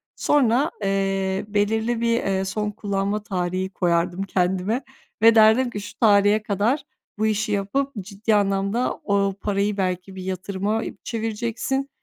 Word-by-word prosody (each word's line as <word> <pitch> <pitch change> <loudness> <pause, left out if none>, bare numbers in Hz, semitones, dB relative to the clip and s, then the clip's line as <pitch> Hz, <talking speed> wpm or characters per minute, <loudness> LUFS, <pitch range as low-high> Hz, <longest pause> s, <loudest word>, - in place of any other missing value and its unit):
Sonra, 275 +1 +2
eee, 195 0 0
belirli 220 +3 0
bir, 235 0 +2
eee, 195 -1 0
son 210 +2 -2
kullanma 200 0 -2
tarihi 185 -1 -2
koyardım 175 0 0
kendime. 190 +6 0 0.4
Ve 230 +1 +7
derdim 220 +3 +5
ki, 205 -3 -5
şu 205 - -9
tarihe 205 -1 +4
kadar 215 +8 0 0.4
bu 215 - +2
işi 215 0 0
yapıp 210 +8 -1
ciddi 210 +3 -1
anlamda 200 +4 0
o 200 -1 +1
parayı 205 0 0
belki 185 0 -2
bir 185 - -7
yatırıma 190 +3 -2 0.2
çevireceksin 235 +4 -2
205 Hz, 135 wpm, -23 LUFS, 195-225 Hz, 0.4 s, Ve